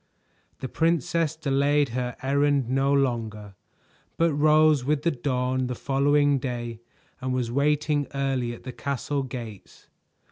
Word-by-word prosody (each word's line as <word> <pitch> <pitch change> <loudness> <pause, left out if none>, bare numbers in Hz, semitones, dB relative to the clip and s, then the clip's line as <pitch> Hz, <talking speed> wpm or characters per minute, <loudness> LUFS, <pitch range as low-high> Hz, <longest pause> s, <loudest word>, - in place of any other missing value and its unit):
The 130 - -3
princess 165 +1 0
delayed 145 -1 +1
her 125 +1 -3
errand 140 -1 +2
no 135 +2 +1
longer, 115 -7 -1 0.6
but 165 -1 +2
rose 155 -1 +4
with 145 +2 0
the 170 - +2
dawn 130 -1 -1
the 125 - -3
following 145 +2 +2
day 120 -3 -4 0.4
and 130 0 -1
was 120 -2 -2
waiting 145 +2 +1
early 135 -3 -1
at 120 - -10
the 130 - -6
castle 140 +2 -2
gates. 120 -6 -9
135 Hz, 135 wpm, -25 LUFS, 125-145 Hz, 0.6 s, rose